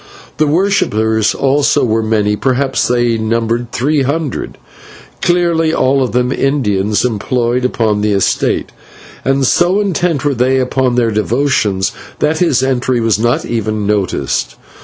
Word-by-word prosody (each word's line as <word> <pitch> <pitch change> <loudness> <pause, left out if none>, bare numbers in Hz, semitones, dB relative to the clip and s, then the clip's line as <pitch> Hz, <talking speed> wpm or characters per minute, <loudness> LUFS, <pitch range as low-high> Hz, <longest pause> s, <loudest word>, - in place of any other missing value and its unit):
The 155 - +2
worshippers 110 - +1
also 140 +1 +2
were 115 -1 +1
many 105 -1 0
perhaps 135 +3 0
they 120 -2 +1
numbered 115 +2 -1
three 145 +4 0
hundred, 145 +1 -3 0.6
clearly 170 -2 +1
all 135 +1 +2
of 125 -4 -1
them 125 +2 0
Indians 105 -8 0
employed 120 +2 -1
upon 110 -4 0
the 105 0 +1
estate; 100 - 0 0.5
and 135 0 +1
so 175 +8 +2
intent 175 -7 -1
were 145 - +2
they 130 +1 +1
upon 130 -1 0
their 120 -2 +1
devotions 110 -3 0 0.3
that 155 +1 0
his 145 -8 +2
entry 130 -1 0
was 115 -3 +1
not 120 +2 0
even 110 -2 -2
noticed. 100 -11 -1
125 Hz, 140 wpm, -14 LUFS, 110-140 Hz, 0.6 s, The